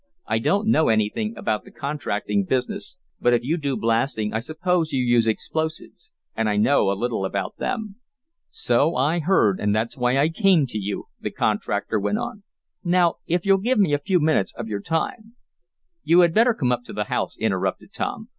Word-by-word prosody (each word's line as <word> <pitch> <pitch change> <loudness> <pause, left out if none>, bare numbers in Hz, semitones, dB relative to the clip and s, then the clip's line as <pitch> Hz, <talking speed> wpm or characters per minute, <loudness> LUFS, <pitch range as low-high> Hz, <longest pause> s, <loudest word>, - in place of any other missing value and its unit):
"I - - 0
don't 200 - +1
know 160 -8 +4
anything 110 0 0
about 105 -1 -1
the - - -14
contracting 105 -8 -2
business, 130 - -2 0.2
but 120 0 +3
if 120 - -1
you 150 +7 0
do 145 -5 -2
blasting 115 -1 0
I 110 - 0
suppose 160 +4 -1
you 130 -2 0
use 120 -2 +3
explosives, 155 +9 -3 0.3
and 110 -1 0
I 105 - 0
know 105 -1 +3
a 100 - 0
little 120 -3 -2
about 95 0 -3
them." 215 -4 -4 0.5
"So 140 +7 +1
I 150 +7 +1
have - - -4
heard, 110 - +3
and 105 0 +1
that's 110 +2 -1
why 125 +1 +1
I 145 +3 +3
came 180 -4 +3
to 115 -4 -5
you," 100 0 -4
the - - -3
contractor 105 +1 -1
went 205 - 0
on. 230 -2 -5 0.4
"Now 175 -1 +2
if 175 +2 0
you'll 195 0 +5
give 245 +6 +1
me 190 -8 +3
a 145 - +2
few 180 +4 +1
minutes 155 -10 +1
of 120 - -6
your 105 -2 -3
time 215 - -3 0.3
" 335 - -55
"You 175 +2 +5
had 170 -2 +3
better 230 +3 +4
come 130 - 0
up 125 -1 0
to - - -9
the 105 - -1
house," - - -3
interrupted 95 - -2
Tom. 220 0 -4
135 Hz, 200 wpm, -23 LUFS, 110-175 Hz, 0.5 s, you'll